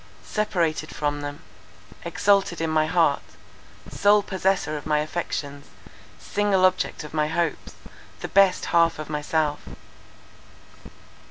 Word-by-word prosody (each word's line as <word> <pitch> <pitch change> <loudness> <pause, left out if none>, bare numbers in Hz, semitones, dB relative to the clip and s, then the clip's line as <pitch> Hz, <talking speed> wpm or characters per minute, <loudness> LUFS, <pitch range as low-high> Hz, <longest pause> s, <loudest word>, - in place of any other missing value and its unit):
Separated 170 -7 -1
from 145 -1 -2
them; 145 0 -6 0.6
exalted 180 +1 +1
in 165 -1 -1
my 155 0 +2
heart; 160 -4 +2 0.7
sole 205 +1 +3
possessor 190 -4 0
of 150 - -6
my 150 -1 +2
affections; 150 -2 -4 0.5
single 200 - +1
object 185 -3 0
of 150 - -10
my 150 -1 +1
hopes, 165 0 -2 0.5
the - - -4
best 195 -2 +3
half 165 -1 +4
of 155 0 -7
myself. 150 0 -1
165 Hz, 115 wpm, -24 LUFS, 150-185 Hz, 0.7 s, half